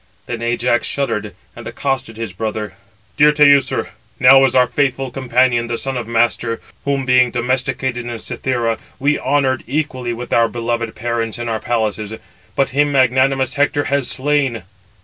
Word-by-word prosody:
Then 120 -1 -5
Ajax 120 0 0
shuddered, 140 -7 -2 0.2
and - - -9
accosted 135 -5 -3
his 115 -5 -5
brother: 110 +1 -4 0.4
"Dear 150 +1 +6
Teucer, 140 -2 +3 0.3
now 135 +1 +7
is 130 - 0
our 125 -1 +6
faithful 135 +1 -1
companion, 125 -2 +1
the 120 0 -2
son 135 +2 -3
of 120 -3 -4
Mastor, 115 0 0 0.3
whom 140 -1 0
being 125 -1 +4
domesticated 125 0 -1
in 120 -1 -4
Cythera, 115 0 -2 0.2
we 145 +2 +1
honoured 135 -2 +1
equally 130 -3 -2
with 120 +1 -6
our 115 -1 +4
beloved 115 -1 -3
parents 115 0 -2
in 120 0 -4
our 110 -1 -1
palaces; 110 -2 -2 0.4
but 135 - +1
him 145 +2 +1
magnanimous 130 0 +2
Hector 145 0 +1
has 140 -3 +1
slain. 135 -6 0
125 Hz, 155 wpm, -18 LUFS, 115-135 Hz, 0.4 s, now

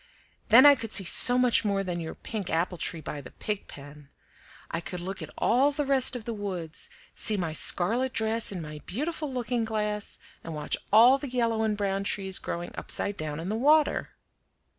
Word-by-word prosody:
"Then 240 +5 +8
I 290 - +10
could 230 -5 -5
see 195 - +1
so 245 +7 +4
much 250 -2 +3
more 200 -2 0
than 175 -2 -3
your 160 -1 -6
pink 210 -5 -6
apple 170 +2 -1
tree 160 - -2
by 145 0 -6
the 130 - -11
pig 210 -2 -5
pen. 145 0 -12 0.6
I 165 - -2
could 180 +1 -7
look 190 +3 -6
at - - -7
all 265 +5 +3
the 290 0 -2
rest 270 -2 +2
of 235 -3 -6
the 235 - -3
woods, 185 -6 -3 0.2
see 215 -2 0
my 165 -4 -2
scarlet 230 +11 +3
dress 220 0 0
in 180 -4 -5
my 150 0 -8
beautiful 300 - -3
looking 245 -2 -1
glass, 210 -2 -2 0.3
and 165 - -6
watch 150 -1 0 0.2
all 240 +6 +7
the 280 - -6
yellow 230 -3 0
and 215 -1 0
brown 195 -1 -1
trees 195 -1 0
growing 170 0 -5
upside 200 - -3
down 155 -2 -5
in 170 +3 -5
the 215 - -1
water. 295 +6 +2
210 Hz, 200 wpm, -27 LUFS, 175-245 Hz, 0.6 s, I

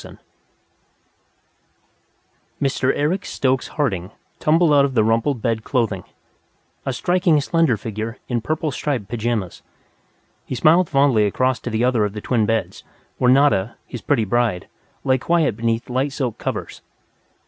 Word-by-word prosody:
"_ - - -12 2.4
Mr. 135 -1 +1
Eric 165 +6 0
Stokes 130 -1 -1
Harding 100 - -2 0.3
tumbled 160 0 +3
out 140 -1 +6
of 135 -2 -1
the 110 - +4
rumpled 115 +3 0
bed 115 -2 0
clothing, 110 -9 -1 0.8
a - - +1
striking 175 +3 +2
slender 155 -4 +1
figure 110 +3 -5
in 120 -3 -1
purple 155 +4 -2
striped 130 -6 -3
pajamas. 115 -4 -3 0.8
He - - -5
smiled 165 +6 +4
fondly 135 -7 +3
across 130 +5 0
to - - -5
the 110 +1 -1
other 125 -3 +2
of 105 -1 -2
the 105 - -6
twin 110 -3 +1
beds, 115 0 -2 0.4
where 125 - +3
Nada, 125 -6 +3
his 120 - -8
pretty 125 -7 +1
bride, 115 -4 0 0.4
lay 130 -1 +2
quiet 160 -5 +1
beneath 115 +1 -1
light 130 +3 -1
silk 130 -6 -3
covers. - - -5
125 Hz, 145 wpm, -21 LUFS, 110-145 Hz, 2.4 s, out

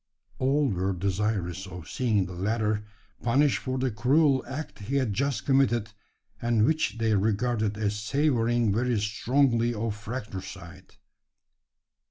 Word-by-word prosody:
All 140 +2 +2
were 95 -3 0
desirous 95 0 -2
of 90 -3 -9
seeing 110 -7 +1
the 90 - -8
latter 105 +3 0 0.4
punished 135 +4 +3
for 130 0 -3
the 130 -1 0
cruel 135 +5 +3
act 145 0 -6
he 110 +7 -4
had 130 -7 +1
just 140 +4 -1
committed, 120 -5 +2 0.5
and 115 -2 +3
which 155 -4 0
they 115 -1 +1
regarded 105 +1 +1
as 105 -1 -1
savouring 120 -2 +1
very 120 +1 +1
strongly 120 +3 +1
of 110 0 -2
fratricide. 100 -4 -8
115 Hz, 130 wpm, -27 LUFS, 100-130 Hz, 0.5 s, punished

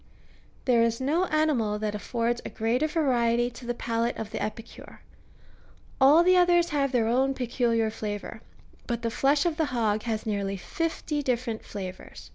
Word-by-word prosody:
There 245 -3 +4
is 230 0 +1
no 305 +8 +1
animal 295 - +1
that 210 0 -2
affords 235 +3 -2
a - - -5
greater 235 +7 0
variety 245 -6 +1
to 240 0 -11
the 240 - -1
palate 230 0 -1
of 220 -1 -6
the 220 - -4
epicure; 215 +2 -7 1.0
all 295 +6 +7
the 365 +1 +5
others 350 -1 +4
have 280 -2 +1
their 240 -4 +2
own 260 +4 +1
peculiar 235 -3 0
flavour, 210 0 -6 0.5
but 235 -1 -3
the 230 - -1
flesh 280 +5 +2
of 335 -3 0
the 320 - +2
hog 225 -6 0
has 220 -1 -3
nearly 200 -2 -2
fifty 320 - -3
different 245 -4 -2
flavours. 185 -3 -8
240 Hz, 165 wpm, -27 LUFS, 220-280 Hz, 1.0 s, all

